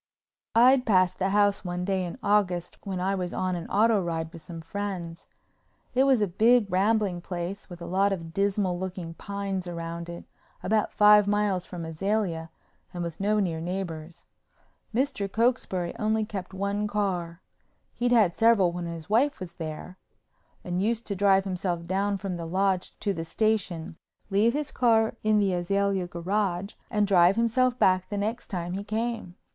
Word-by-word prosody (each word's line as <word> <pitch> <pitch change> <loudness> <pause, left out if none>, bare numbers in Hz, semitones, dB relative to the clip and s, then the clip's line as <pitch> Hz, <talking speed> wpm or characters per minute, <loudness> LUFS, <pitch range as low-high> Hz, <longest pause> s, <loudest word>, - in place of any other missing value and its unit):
I'd 250 +3 +6
passed 185 -3 +3
the 190 0 +1
house 205 0 +2
one 180 -1 -3
day 190 -1 0
in 175 +6 -5
August 185 -4 +1
when 190 -3 -4
I 190 +2 0
was 180 -2 -3
on 185 -1 -1
an 170 - -5
auto 215 0 +3
ride 165 -2 -3
with 165 - -10
some 165 +1 -8
friends. 175 -1 -5 0.7
It 260 +2 +4
was 260 -6 +4
a - - +1
big, 225 +6 +4
rambling 195 -1 +1
place 180 +3 -5
with 175 -1 -9
a - - -5
lot 195 +3 +2
of 165 -4 -4
dismal 195 -1 0
looking 180 -3 -5
pines 195 0 -4
around 170 0 -5
it, 170 0 -8 0.4
about 215 +2 +1
five 210 -1 +6
miles 205 -3 +1
from 175 -2 -6
Azalea 165 0 -2 0.4
and 175 -1 -4
with 170 -2 -6
no 210 +2 +2
near 170 -5 -1
neighbors. 170 -2 -5 0.7
Mr. 240 -5 -1
Cokesbury 220 -7 0
only 215 0 +1
kept 195 -4 -6
one 200 +2 -1
car—he'd 195 +4 -4
had 215 -8 +4
several 225 -6 +4
when 175 0 -4
his 165 -1 -7
wife 255 +7 +2
was 185 -3 -7
there—and 175 +2 -8
used 225 +2 0
to 200 - -3
drive 195 0 +4
himself 180 -3 -3
down 195 +3 0
from 190 -2 -4
the 165 -1 -5
Lodge 190 +1 0
to 200 - 0
the 165 - -4
station, 180 -4 -1 0.3
leave 215 +4 +3
his 295 0 -2
car 225 -3 +3
in 215 0 +3
the 200 -2 +2
Azalea 195 +1 0
garage, 185 +2 -2 0.2
and 210 -2 +2
drive 185 -1 +5
himself 240 +2 +2
back 185 -3 +3
the 205 - -3
next 220 +4 -2
time 175 -2 -4
he 195 +2 -3
came. 220 -3 -3
195 Hz, 170 wpm, -27 LUFS, 175-210 Hz, 0.7 s, I'd